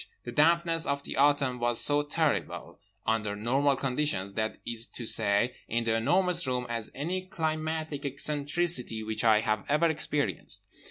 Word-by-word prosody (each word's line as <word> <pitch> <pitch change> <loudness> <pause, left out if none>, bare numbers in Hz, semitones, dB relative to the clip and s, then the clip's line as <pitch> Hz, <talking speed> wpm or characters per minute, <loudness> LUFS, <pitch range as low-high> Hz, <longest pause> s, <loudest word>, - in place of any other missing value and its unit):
The 120 - -6
dampness 165 +3 +2
of 140 0 -1
the - - -6
Autumn 140 -2 +2
was 120 0 +5
as 145 0 +2
terrible, 155 -1 -2 0.3
under 110 -2 0
normal 135 +6 +1
conditions—that 115 -7 -1
is 115 0 -1
to 120 - -7
say 105 +3 +3
in 115 +1 -1
The 115 -1 +1
Enormous 175 +7 +2
Room—as 125 -3 -3
any 185 +6 -3
climatic 155 -3 -3
eccentricity 145 -3 -1
which 110 0 -2
I 110 -2 +5
have 110 -2 -1
ever 150 +4 +3
experienced. 150 -2 -2
140 Hz, 145 wpm, -28 LUFS, 115-155 Hz, 0.3 s, was